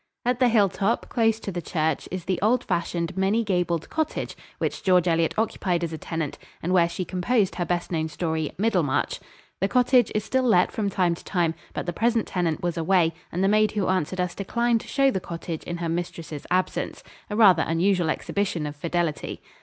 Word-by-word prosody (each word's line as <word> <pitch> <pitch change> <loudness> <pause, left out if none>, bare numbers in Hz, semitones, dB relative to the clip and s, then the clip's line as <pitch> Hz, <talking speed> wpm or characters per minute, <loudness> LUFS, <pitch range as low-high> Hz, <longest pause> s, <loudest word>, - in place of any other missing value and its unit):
At 245 0 +1
the 250 -2 +5
hilltop, 205 0 +2
close 225 -2 +2
to 200 - -4
the 175 -1 -4
church, 160 -3 -1
is 185 -2 -5
the 185 -2 -1
old 235 +4 +3
fashioned, 170 0 -2
many 195 +4 +2
gabled 180 -5 0
cottage 315 -1 -2 0.2
which - - -2
George 180 -2 +3
Eliot 165 -1 +2
occupied 185 -5 0
as 165 -1 -3
a - - -3
tenant 160 -3 -4 0.2
and 180 +3 0
where 170 -2 +4
she 185 +1 -4
composed 190 +4 +1
her 175 - -2
best 175 0 -2
known 160 -2 0
story, 160 -1 -2
"Middlemarch." 185 -9 +1 0.4
The 195 - +2
cottage 250 +2 +4
is 215 - +1
still 260 +4 +1
let 220 -8 +3
from 205 -2 -1
time 180 -3 +1
to 170 - -9
time, 170 -4 0 0.2
but - - -3
the 175 - -2
present 230 +2 +1
tenant 175 -4 -1
was 175 -1 -1
away 165 0 +3 0.2
and 180 +3 -1
the - - +4
maid 215 +1 +3
who 205 -4 0
answered 185 0 0
us 180 -1 0
declined 235 +3 0
to - - -13
show 275 -1 +3
the 190 - -1
cottage 165 -2 -6
in 175 - -4
her 170 0 -3
mistress' 165 -3 -4
absence 185 +1 -1 0.3
a 210 - -3
rather 195 -7 +6
unusual 175 +1 +2
exhibition 180 -1 -1
of 145 0 -5
fidelity. 170 0 -2
180 Hz, 200 wpm, -25 LUFS, 170-210 Hz, 0.4 s, rather